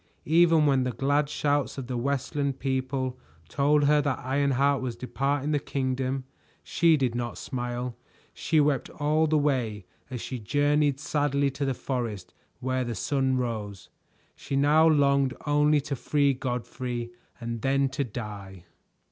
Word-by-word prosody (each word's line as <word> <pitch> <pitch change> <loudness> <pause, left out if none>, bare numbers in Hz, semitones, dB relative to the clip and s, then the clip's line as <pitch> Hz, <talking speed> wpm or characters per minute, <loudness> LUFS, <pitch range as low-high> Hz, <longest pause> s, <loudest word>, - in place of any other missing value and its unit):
Even 165 0 +5
when 135 -3 +3
the 125 -1 -2
glad 145 +3 +1
shouts 145 -1 0
of 135 - -4
the 125 0 -4
Westland 140 +2 -1
people 130 -1 -2 0.3
told 145 +5 +2
her 150 +1 +4
that 145 -2 -1
Ironheart 140 0 +2
was 125 -3 -3
departing 140 +4 -1
the 145 - +2
kingdom, 130 -1 -2 0.4
she 165 -2 +3
did 130 -4 0
not 120 0 -3
smile. 125 -1 -4 0.4
She 160 - +1
wept 145 -3 +1
all 155 +2 +1
the 155 0 +2
way 125 -9 0 0.2
as 125 -2 -5
she 125 +2 -5
journeyed 145 +4 +1
sadly 145 -1 0
to 140 +2 -3
the 135 -1 -1
forest 115 -8 -4 0.3
where 130 0 -1
the 120 -2 -4
sun 135 -1 0
rose. 110 -6 -4 0.5
She 140 - -5
now 150 +3 +5
longed 140 -3 +3
only 150 0 +3
to 140 0 -4
free 140 +2 +1
Godfrey 125 -1 -4 0.3
and 115 -1 -5
then 135 0 +2
to 135 +2 -2
die. 100 -6 -8
135 Hz, 150 wpm, -27 LUFS, 125-145 Hz, 0.5 s, Even